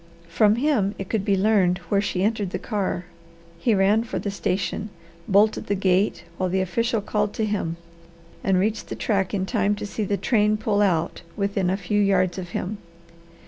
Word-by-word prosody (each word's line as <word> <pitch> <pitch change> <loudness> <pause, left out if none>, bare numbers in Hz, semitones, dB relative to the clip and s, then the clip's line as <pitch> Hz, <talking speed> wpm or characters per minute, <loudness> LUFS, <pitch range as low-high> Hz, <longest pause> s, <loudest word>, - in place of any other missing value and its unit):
From 205 +5 +4
him 240 -7 +1
it 195 - -6
could 220 -4 0
be 200 -1 +2
learned 190 -3 +3
where 200 -1 +3
she 190 -2 -1
entered 210 -2 0
the - - -3
car. 195 -5 -2 0.5
He 225 +3 +2
ran 200 +3 +3
for 235 - -4
the 200 - -3
station, 195 +1 -2 0.4
bolted 205 +2 +3
the 205 - +1
gate 190 +1 +1
while 185 -1 0
the 190 +2 +1
official 225 +5 0
called 210 0 -1
to 220 - 0
him, 195 -6 -2 0.7
and 190 -1 +2
reached 210 +4 0
the - - -4
track 195 -4 0
in 190 -2 -1
time 200 +2 +1
to 205 - -5
see 210 +1 -3
the 200 0 0
train 215 -2 +2
pull 210 -1 +1
out 170 -5 +1 0.2
within 200 -2 0
a 190 - +1
few 205 +2 0
yards 195 -2 +2
of 175 -2 -6
him. 200 +4 -4
200 Hz, 190 wpm, -24 LUFS, 190-210 Hz, 0.7 s, From